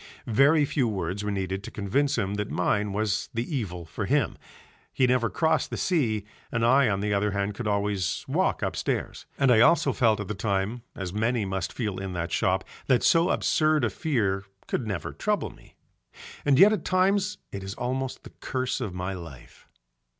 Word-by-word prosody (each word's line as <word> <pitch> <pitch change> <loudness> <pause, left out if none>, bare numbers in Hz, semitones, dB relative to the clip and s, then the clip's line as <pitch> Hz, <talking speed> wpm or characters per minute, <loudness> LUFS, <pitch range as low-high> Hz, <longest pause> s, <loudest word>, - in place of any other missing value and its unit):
Very 140 +7 +4
few 135 -3 0
words 95 -1 -3
were 105 - -2
needed 95 -1 -2
to - - -6
convince 135 +9 0
him 95 +1 -1
that 105 0 -3
mine 105 -1 0
was 105 +1 -1
the 120 +7 -2
evil 90 -9 -4
for - - -5
him, - - +1 0.6
he 130 - +2
never 125 -2 +2
crossed 160 -3 +1
the - - -4
sea, 115 - 0 0.3
and 115 -1 +1
I 130 +1 +5
on 100 -1 0
the 105 0 0
other 100 +1 +1
hand 100 +1 -1
could 110 +2 -5
always 100 -3 -1
walk - - 0
upstairs, - - -2
and 135 -2 +4
I 115 - +6
also 165 +9 +5
felt 110 -6 +3
at 105 - -4
the 105 - -2
time, 100 +3 -1
as 95 -2 -5
many 110 +1 0
must 95 -3 -3
feel 105 -5 -3
in 95 -1 -5
that 85 -1 -3
shop, 95 0 +1 0.2
that 125 -3 +3
so 165 +1 +4
absurd 155 -4 +2
a 110 - -1
fear 105 -9 0 0.2
could 120 - -2
never 95 -7 -3
trouble - - -1
me. - - -20 0.7
And 140 -2 +4
yet 200 +5 +8
at 215 - -2
times 195 +2 +2
it 100 - -5
is 95 +1 -6
almost 130 +1 -3
the - - -12
curse 130 0 -2
of 100 -7 -4
my 90 +1 -3
life. 85 -9 -11
105 Hz, 195 wpm, -26 LUFS, 95-130 Hz, 0.7 s, yet